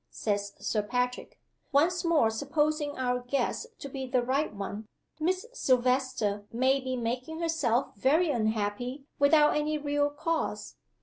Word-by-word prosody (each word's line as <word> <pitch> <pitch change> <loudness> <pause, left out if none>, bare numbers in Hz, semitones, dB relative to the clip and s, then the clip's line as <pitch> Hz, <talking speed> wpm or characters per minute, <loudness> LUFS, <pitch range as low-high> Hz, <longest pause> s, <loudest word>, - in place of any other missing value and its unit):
says 200 - -2
Sir 215 - 0
Patrick. 250 +4 -2 0.3
'Once 335 +7 +3
more 315 -10 +3
supposing 295 +4 0
our 250 -1 0
guess 270 - -1
to - - -7
be 265 -1 -5
the 250 -1 +1
right 275 +5 0
one, 205 +1 -6 0.3
Miss 370 +6 0
Silvester 250 - +1
may 260 +3 +2
be 260 -1 -3
making 250 +6 -3
herself 285 -7 0
very 300 - +3
unhappy 225 +3 -1
without 295 +1 +5
any 300 +1 0
real 290 0 +1
cause. 320 +3 -3
260 Hz, 135 wpm, -29 LUFS, 240-300 Hz, 0.3 s, without